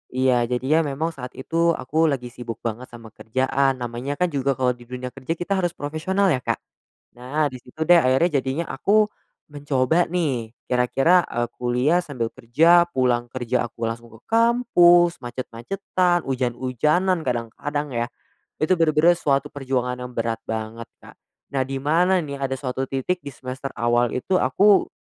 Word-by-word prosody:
Iya. 130 0 +3 0.2
Jadi 125 +1 -1
ya 160 - +5
memang 155 +1 -1
saat 125 -5 -9
itu 165 +4 +1
aku 160 +5 +1
lagi 125 -4 -2
sibuk 120 -2 -7
banget 120 +2 -4
sama 115 -2 -12
kerjaan. 130 +5 0
Namanya 125 +3 -4
kan 180 +2 0
juga 140 -2 0
kalau 125 -1 +1
di 120 -1 -11
dunia 125 0 -6
kerja 135 +5 -4
kita 190 +3 -1
harus 175 -2 -1
profesional 180 +7 0
ya, 130 - +1
Kak? - - -2 0.6
Nah, 140 +5 -1
di 130 - -8
situ 125 - -18
deh 175 - +8
akhirnya 130 +7 +3
jadinya 135 +6 -2
aku 210 +9 +2 0.4
mencoba 145 +2 +1
nih, 135 -11 -1 0.2
kira-kira, 135 +8 +3
eee, 120 0 -1
kuliah 125 +8 +1
sambil 130 -8 -3
kerja, 160 +9 +5
pulang 125 -4 0
kerja 125 -1 -1
aku 115 -1 -3
langsung 115 +1 -6
ke 110 - -15
kampus, 225 -7 +4
macet-macetan, 175 - -1
hujan-hujanan, 130 +8 0
kadang-kadang 130 +4 -3
ya, 120 0 0 0.6
itu 155 - +3
benar-benar 165 +1 +4
suatu 140 -2 0
perjuangan 130 -2 -2
yang 125 0 -7
berat 115 -1 -1
banget, 110 +1 -5 0.2
Kak. - - -14 0.4
Nah 135 -1 0
di 135 0 -3
mana 175 +5 +3
nih 140 -2 -6
ada 135 -1 -2
suatu 130 0 -3
titik 135 +8 -2
di 140 - -5
semester 130 +2 -6
awal 120 0 +1
itu 185 +9 0
aku 195 +11 +4
135 Hz, 165 wpm, -23 LUFS, 125-165 Hz, 0.6 s, deh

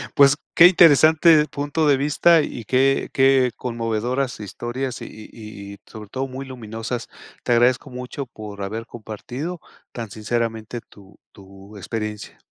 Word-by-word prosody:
Pues, 140 0 +6 0.2
qué 175 - +9
interesante 160 -2 +6
punto 145 +2 -1
de 140 - +5
vista, 155 +4 +4
y 120 -6 -6
qué 135 +2 +2
qué 135 -2 +4
conmovedoras 120 +2 -2
historias, 120 +5 -5
y - - -6
y 105 -2 -11
y - - -12
sobre 105 -2 -11
todo 135 +1 -3
muy 135 +1 -7
luminosas. 115 -1 -6 0.4
Te 120 - +1
agradezco 120 +1 +2
mucho 125 +2 -6
por 105 -4 -10
haber 110 +4 -5
compartido 125 - -7 0.3
tan 115 -3 -6
sinceramente 115 +1 -3
tu 100 -1 -18
tu 100 +1 -15
experiencia. 105 +1 -6
120 Hz, 140 wpm, -22 LUFS, 110-135 Hz, 0.4 s, qué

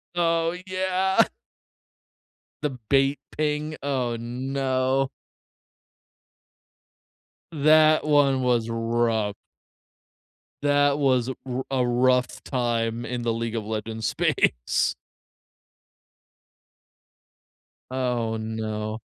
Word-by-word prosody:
Oh 165 0 +1
yeah. 190 +3 +2 1.4
The 150 - 0 0.2
bait 135 0 +3
ping, 150 0 -2
oh 125 -4 -1
no. 130 +2 -1 2.4
That 155 0 +5
one 140 -3 +3
was 120 -2 +1
rough. 115 -2 0 1.3
That 145 0 +3
was 130 -3 +2
a 130 - -4
r 130 0 -3
a 130 -2 +2
rough 125 +1 +1
time 120 -2 -1
in 125 -1 -3
the 115 -1 0
League 115 0 -3
of 110 - -3
Legends 110 0 -3
space. - - +1 3.0
Oh 120 -3 -1
no. 110 0 -4
130 Hz, 80 wpm, -25 LUFS, 115-145 Hz, 3.0 s, That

